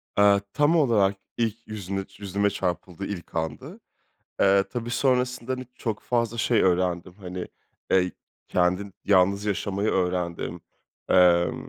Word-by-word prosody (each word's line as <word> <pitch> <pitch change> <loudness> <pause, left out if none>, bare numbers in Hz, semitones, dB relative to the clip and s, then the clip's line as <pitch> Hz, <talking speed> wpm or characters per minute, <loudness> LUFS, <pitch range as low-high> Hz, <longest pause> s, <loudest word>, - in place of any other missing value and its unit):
Aaa, 100 0 +5
tam 150 +3 +3
olarak 110 -10 +3 0.2
ilk 115 0 -2
yüzüne 100 -2 -4
yüzüme 100 +1 0
çarpıldığı 95 -1 -3
ilk 85 -5 -7
andı. 80 -1 -4 0.6
Eee, 100 0 +5
tabii 120 -1 -4
sonrasında, 125 0 0
hani, 130 0 -5
çok 110 -3 -3
fazla 115 -1 -1
şey 115 0 +2
öğrendim. 90 -1 +1
Hani, 90 -2 -7 0.4
eee, 90 -1 +3 0.4
kendin 90 +2 0
yalnız 100 +1 +3
yaşamayı 100 +1 -1
öğrendim. 90 -2 -1 0.5
Emm, 85 -1 +4
100 Hz, 125 wpm, -25 LUFS, 90-115 Hz, 0.6 s, Aaa